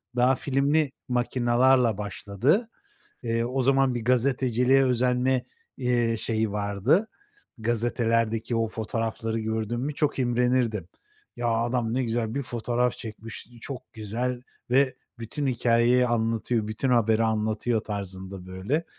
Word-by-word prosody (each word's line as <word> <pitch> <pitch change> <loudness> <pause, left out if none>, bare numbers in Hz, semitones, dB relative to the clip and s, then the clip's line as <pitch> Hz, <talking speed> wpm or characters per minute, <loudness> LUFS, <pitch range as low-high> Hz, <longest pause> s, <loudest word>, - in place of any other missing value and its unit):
daha 125 +2 +4
filmli 140 +2 +1 0.2
makinalarla 125 -1 +3
başladı. 105 - 0 0.5
Iıı, 115 0 0
o 130 +2 -1
zaman 135 -1 +3
bir 115 - -3
gazeteciliğe 125 +1 +3
özenme, 125 0 +1 0.4
ııı, 120 -2 +1
şeyi 110 -1 -1
vardı, 105 - +1 0.5
gazetelerdeki 115 0 0
o 115 0 +1
fotoğrafları 115 0 -3
gördüm 110 +2 -2
mü 150 +3 -2
çok 150 -3 0
imrenirdim. 120 -5 +1 0.5
Ya, 120 - -1
adam 115 0 0
ne 130 +1 +1
güzel 115 0 -2
bir 140 - 0
fotoğraf 120 +1 0
çekmiş, 110 -1 -8
çok 130 0 -8
güzel 120 +3 -3 0.3
ve 130 0 +3 0.2
bütün 125 +5 -3
hikâyeyi 120 0 +3
anlatıyor, 115 -1 0
bütün 110 +5 -2
haberi 115 -2 +3
anlatıyor 110 +1 0
tarzında, 95 -2 -6
böyle, 100 - -2
120 Hz, 120 wpm, -26 LUFS, 110-125 Hz, 0.5 s, daha